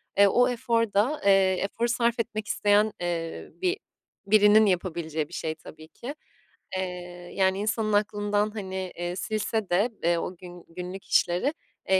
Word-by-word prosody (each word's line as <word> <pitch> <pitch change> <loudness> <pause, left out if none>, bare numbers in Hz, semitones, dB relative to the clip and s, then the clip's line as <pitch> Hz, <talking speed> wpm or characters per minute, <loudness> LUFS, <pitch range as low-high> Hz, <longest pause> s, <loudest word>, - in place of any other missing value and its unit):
E, 200 +1 +7
o 245 +5 +4
efor 230 -2 0
da, 245 +10 +2
eee, 195 -2 +5
efor 230 +4 -1
sarf 235 0 +1
etmek 215 -2 -3
isteyen, 210 +1 +3
eee, 170 -2 -3
bi 370 +1 +1 0.5
birinin 210 +1 +6
yapabileceği 170 -5 -1
bir - - -16
şey 160 0 -3
tabii 155 0 -13
ki. 255 - -8 0.6
Eee, 180 -1 -6
yani, 190 0 +2
insanın 215 0 0
aklından, 205 0 +1
hani, 190 -3 -5
eee, 175 +1 -3
silse 215 +1 -2
de, 195 +7 +3
eee, 170 +1 +3
o 180 +2 -4
gün 175 -1 -11
günlük 180 +3 -7
işleri, 180 - +2 0.4
eee, 190 0 +5
195 Hz, 155 wpm, -27 LUFS, 180-215 Hz, 0.6 s, E